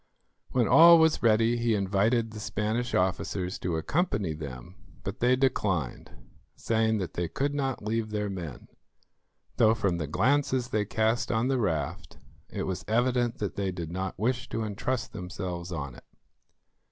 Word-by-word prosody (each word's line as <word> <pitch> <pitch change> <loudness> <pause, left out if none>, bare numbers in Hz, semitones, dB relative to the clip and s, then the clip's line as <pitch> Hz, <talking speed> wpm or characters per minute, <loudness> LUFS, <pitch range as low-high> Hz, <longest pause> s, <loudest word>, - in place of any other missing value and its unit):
When 120 -4 +2
all 170 +6 +9
was 160 -1 +3
ready, 115 +1 +3
he 115 -1 +1
invited 105 +4 +1
the 110 - -8
Spanish 110 +3 -2
officers 90 0 -1
to 85 -3 -2
accompany 105 - 0
them, 70 0 -8 0.3
but 100 +6 -5
they 125 +1 +4
declined, 100 - -1 0.5
saying 110 -1 +1
that 95 -4 -4
they 85 -1 -2
could 140 - -2
not 135 -5 -2
leave 110 0 -1
their 105 -1 -2
men, 85 -10 -7 0.9
though 110 -1 +5
from 90 -5 0
the 75 - -3
glances 130 - +1
they 105 -1 0
cast 110 +2 0
on 115 +3 +1
the 135 -2 +1
raft, 85 - -2 0.3
it - - -4
was 95 -2 -3
evident 120 +2 +1
that 105 - -3
they 100 -2 -1
did 85 -3 -6
not 95 +1 -4
wish 125 +5 -1
to 115 - -2
entrust 110 +4 -3
themselves 90 -2 -5
on 70 -6 -4
it. - - -15
110 Hz, 160 wpm, -28 LUFS, 90-120 Hz, 0.9 s, all